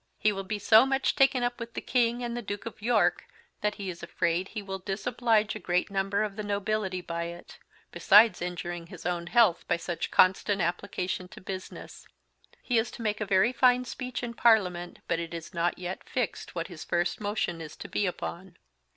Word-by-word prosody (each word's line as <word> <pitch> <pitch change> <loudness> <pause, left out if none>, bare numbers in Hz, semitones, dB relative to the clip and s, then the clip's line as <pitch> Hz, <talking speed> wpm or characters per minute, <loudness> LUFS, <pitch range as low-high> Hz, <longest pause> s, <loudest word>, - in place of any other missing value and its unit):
He 215 - +3
will 195 -1 -4
be 210 +2 -3
so 220 +3 +6
much 270 0 +1
taken 270 -2 +4
up 245 0 -1
with 230 0 -7
the - - -1
King 240 -1 +1
and 240 0 -3
the 240 - -3
Duke 205 -1 -5
of 230 - -8
York, 235 +3 +2 0.3
that 210 0 0
he 200 - -6
is 175 -2 -6
afraid 170 +1 -1
he 215 - -6
will 190 -1 -5
Disoblige 215 +3 0
a 215 - -6
great 180 0 0
Number 195 +1 0
of 205 -2 -4
the 215 - -3
Nobility 205 -2 -1
by 170 -1 -4
it, 170 +1 -9 0.3
besides 215 +1 +6
injuring 175 -1 -4
his 180 -3 -11
own 175 -1 -2
health 190 -2 +4
by - - +2
such 170 0 -4
Constant 195 +2 +3
application 180 +1 -2
to - - -12
business. 190 0 -8 0.6
He 240 -3 +2
is 225 - -1
to 230 - -7
make 210 -1 -1
a 210 - -1
very 195 +6 +3
fine 250 0 +4
Speech 250 +1 -5
in 235 -1 -4
Parliament, 185 -7 +2
but 165 - 0
it 170 0 -5
is 165 -1 -8
not 170 0 0
yet 180 +1 -6
Fixed 245 -8 -3
what 170 -1 -2
his 175 -4 -9
First 175 +3 -1
Motion 205 -5 -2
is 155 -2 -8
to - - -8
be 205 - 0
upon. 180 0 -6
195 Hz, 205 wpm, -28 LUFS, 175-225 Hz, 0.6 s, so